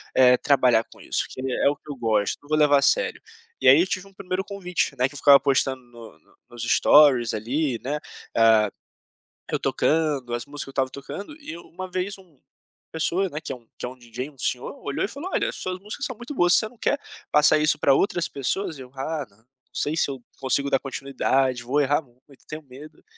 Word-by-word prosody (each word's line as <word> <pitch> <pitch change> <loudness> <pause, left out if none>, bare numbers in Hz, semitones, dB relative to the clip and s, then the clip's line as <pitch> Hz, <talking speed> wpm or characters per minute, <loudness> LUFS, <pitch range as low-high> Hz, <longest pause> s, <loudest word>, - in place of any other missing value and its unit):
eh, 125 -1 +6
trabalhar 125 -5 +3
com - - -16
isso, - - -1
porque 130 - -9
é - - +2
o 145 - -1
que 145 +1 -11
eu - - -6
gosto, 110 -4 0
não - - -17
vou 155 - +2
levar 145 -2 +5
a - - -2
sério." - - +1 0.4
E - - +2
aí 135 +4 +9
eu 185 - +1
tive 185 +1 -3
um 195 - -19
1º 185 0 -3
convite, 180 -7 -2
né, 130 +1 +3
que 145 - -15
ficava 140 -1 +7
postando 135 -1 +1
no 115 -8 -14
no - - -29
nos 120 -1 -7
storys 125 -1 +5
ali, 125 +3 -1
né, 145 +3 -2 0.4
ah, 110 -2 +5 0.8
eu - - 0
tocando, 150 -6 0
as 120 0 -3
músicas 145 0 -6
que - - -11
eu - - -9
estava 135 -1 0
tocando 195 - -8
e 165 - -8
uma 185 +2 -9
vez 185 +2 -3
uma 185 -2 -19
uma 140 - -39
pessoa, 185 +4 +1
né, 150 +1 -6
que - - -6
é - - -3
um 115 -2 -18
que - - -5
é - - -4
um 130 - -12
DJ, 125 +3 -7
um 135 - -25
senhor, 125 +2 -2
olhou 140 - -2
e - - -3
falou: 285 - -7
"Olha, - - 0
as - - -6
suas 185 0 -4
músicas 210 +8 -6
são 255 - -5
muito 240 +6 -8
boas, 175 -6 +3
você 220 - +2
não 245 - -21
quer 285 - +1 0.3
passar 150 +1 +5
isso 150 +1 +2
para 140 - +4
outras 175 +2 +1
pessoas?" 150 +4 -2
E - - -9
eu 125 0 -12
"Ah 145 +2 -3
não, 100 - -27
não 110 - -31 0.3
sei 150 +2 -1
se 145 - +1
eu 130 -3 -7 0.2
consigo 140 +1 0
dar 135 - +2
continuidade, 135 -2 0
vou 140 +5 +1
errar 145 +3 +2
muito, 130 +1 -23
tenho 155 0 -7
medo." 140 +3 -14
140 Hz, 235 wpm, -24 LUFS, 125-170 Hz, 0.8 s, aí